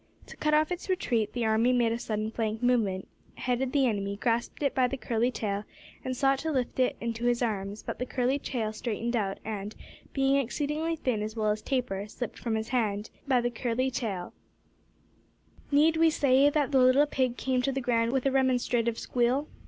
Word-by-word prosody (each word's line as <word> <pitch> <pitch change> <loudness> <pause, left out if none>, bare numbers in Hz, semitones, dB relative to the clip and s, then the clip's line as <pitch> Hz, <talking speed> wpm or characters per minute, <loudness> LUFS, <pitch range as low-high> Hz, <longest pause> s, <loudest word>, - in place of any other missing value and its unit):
To - - -12
cut 300 0 +2
off 310 +2 +2
its 360 +2 -4
retreat, 235 - 0
the 240 -2 -1
army 220 +3 +3
made 240 -2 +2
a 230 - -2
sudden 215 -2 -2
flank 220 0 -2
movement, 215 -7 +1 0.3
headed 255 +1 -1
the 275 -1 +3
enemy, 200 -4 -1
grasped 235 +5 -1
it 280 - +1
by 255 -1 +3
the 270 - -4
curly 235 -1 0
tail, 205 -4 -3 0.4
and 255 -1 -3
sought 270 0 +3
to 320 +2 -2
lift 260 -3 -2
it 255 - +2
into 230 0 -3
his 245 0 +2
arms, 205 -2 -3
but - - -5
the 250 - -2
curly 255 +3 0
tail 225 -6 -3
straightened 235 +2 -2
out, 195 -4 -1
and, 210 -1 -5 0.4
being 270 0 +2
exceedingly 300 +5 -1
thin 250 -8 -1
as 215 +1 -4
well 215 -2 +1
as 215 +1 -2
taper, 225 -6 -2
slipped 235 +1 -6
from 230 -2 -1
his 220 +1 -3
hand. 215 -4 -1 2.6
Need 310 +3 +4
we 325 0 +5
say 280 -2 +4
that 290 -1 0
the 270 - +4
little 255 +3 +6
pig 260 -4 -1
came 260 -1 0
to 275 +2 0
the 270 - -2
ground 235 -2 +1
with 265 0 0
a 275 - +3
remonstrative 245 -3 +1
squeal? 250 +4 +1
245 Hz, 190 wpm, -28 LUFS, 220-270 Hz, 2.6 s, little